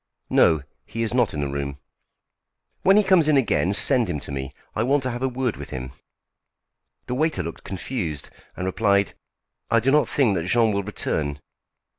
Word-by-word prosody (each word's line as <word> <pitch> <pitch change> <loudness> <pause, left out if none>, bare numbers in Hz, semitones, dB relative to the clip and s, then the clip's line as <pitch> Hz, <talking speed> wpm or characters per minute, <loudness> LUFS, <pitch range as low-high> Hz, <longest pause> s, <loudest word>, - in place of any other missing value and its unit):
"No, 80 -3 +4 0.2
he 115 - -3
is 115 - -2
not 125 -3 +2
in 75 - -3
the 70 - -1
room." 70 0 -4 1.0
"When 195 +2 +5
he 210 - +5
comes 185 -5 +4
in 150 -2 +4
again, 105 -7 +2
send 120 +1 +3
him 75 -4 -2
to - - -8
me. 65 -1 -4 0.2
I 110 - 0
want 135 +4 +2
to 130 - -1
have 120 +1 -5
a 130 - +1
word 125 -2 -2
with - - -8
him." 65 0 -6 1.1
The 125 - -4
waiter 155 +5 0
looked 85 +1 -7
confused, 90 - -4 0.3
and 90 - -3
replied: 100 +1 +2 0.6
"I 115 - +4
do 130 +4 +2
not 150 +1 +3
think 130 -8 +2
that 85 -3 -2
Jean 115 +3 +3
will 100 -1 0
return." 75 -7 -3
110 Hz, 190 wpm, -23 LUFS, 80-130 Hz, 1.1 s, When